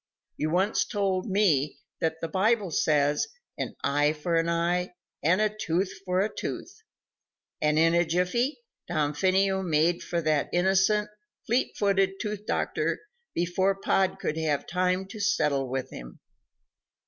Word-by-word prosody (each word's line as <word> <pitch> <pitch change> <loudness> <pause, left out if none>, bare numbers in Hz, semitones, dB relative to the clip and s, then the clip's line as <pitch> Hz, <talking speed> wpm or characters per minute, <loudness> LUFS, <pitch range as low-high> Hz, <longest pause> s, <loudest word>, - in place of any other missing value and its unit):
"You 155 - -1
once 190 +6 +2
told 195 -4 -1
me 170 -8 +2 0.2
that 160 0 -1
the 165 - -2
Bible 200 +2 +1
says, 145 -1 +2 0.3
'An - - -3
eye 145 +2 +2
for 155 +3 -3
an 165 0 +2
eye, 175 +2 0 0.3
and 175 +6 +3
a 215 0 +1
tooth 185 -2 -1
for 180 0 +1
a 210 +2 -2
tooth,'" - - -6 0.8
and 150 0 +2
in 165 +1 +4
a 170 0 +4
jiffy 180 - 0 0.3
Damfino 185 +5 +1
made 170 0 +2
for 170 - -2
that 155 -3 +1
innocent, 190 +3 +3 0.4
fleet 240 +3 0
footed 195 -1 +1
tooth 210 -1 -4
doctor, - - -1 0.4
before 185 +3 +1
Pod 195 -1 +1
could 155 - -2
have 155 -3 0
time 185 +1 0
to 200 +3 -10
settle 140 -9 +1
with 130 0 -3
him. - - -10
180 Hz, 145 wpm, -27 LUFS, 155-195 Hz, 0.8 s, in